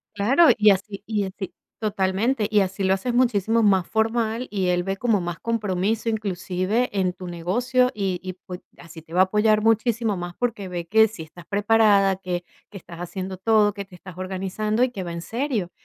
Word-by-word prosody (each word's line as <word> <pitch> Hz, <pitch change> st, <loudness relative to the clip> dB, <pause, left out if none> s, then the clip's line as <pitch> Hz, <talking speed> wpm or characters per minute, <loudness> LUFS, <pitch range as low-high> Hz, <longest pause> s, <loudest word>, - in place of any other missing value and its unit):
Claro, 265 Hz, +12 st, +5 dB
y 210 Hz, 0 st, +6 dB
así 200 Hz, +1 st, 0 dB
y 210 Hz, -2 st, 0 dB
así 190 Hz, 0 st, -6 dB, 0.2 s
totalmente, 210 Hz, +3 st, 0 dB
y 210 Hz, -, +4 dB
así 195 Hz, +1 st, -1 dB
lo 190 Hz, 0 st, +3 dB
haces 235 Hz, +6 st, -2 dB
muchísimo 230 Hz, -2 st, +2 dB
más 190 Hz, -4 st, +3 dB
formal, 225 Hz, +2 st, 0 dB
y 190 Hz, -3 st, -1 dB
él 180 Hz, 0 st, +1 dB
ve 195 Hz, +1 st, -2 dB
como 220 Hz, -1 st, +1 dB
más 175 Hz, -1 st, -5 dB
compromiso, 215 Hz, -1 st, -1 dB
inclusive, 200 Hz, +1 st, -1 dB
en 185 Hz, -2 st, +1 dB
tu 185 Hz, -, -10 dB
negocio, 245 Hz, +10 st, +1 dB
y 190 Hz, -3 st, -1 dB
y 185 Hz, 0 st, -6 dB
pue 180 Hz, 0 st, -10 dB, 0.2 s
así 165 Hz, -1 st, -12 dB
te 160 Hz, -, -22 dB
va 185 Hz, -, +4 dB
a -, -, +8 dB
apoyar 210 Hz, +2 st, +2 dB
muchísimo 225 Hz, -1 st, +1 dB
más, 175 Hz, 0 st, -6 dB
porque 230 Hz, -6 st, -2 dB
ve 175 Hz, -2 st, -5 dB
que 220 Hz, +3 st, +5 dB
sí 200 Hz, -7 st, -9 dB
estás 170 Hz, +2 st, -14 dB
preparada, 205 Hz, -2 st, +3 dB
que 180 Hz, -2 st, -4 dB, 0.3 s
que 205 Hz, -, -10 dB
estás 170 Hz, -2 st, -12 dB
haciendo 185 Hz, +1 st, -5 dB
todo, 210 Hz, 0 st, +3 dB
que 200 Hz, -1 st, -6 dB
te 185 Hz, -2 st, -15 dB
estás 180 Hz, 0 st, -12 dB
organizando 195 Hz, +4 st, -1 dB
y 255 Hz, -, +1 dB
que 195 Hz, -6 st, -5 dB
va 170 Hz, -1 st, -5 dB
en 170 Hz, 0 st, -6 dB
serio. 230 Hz, -, -2 dB
200 Hz, 200 wpm, -23 LUFS, 185-220 Hz, 0.3 s, a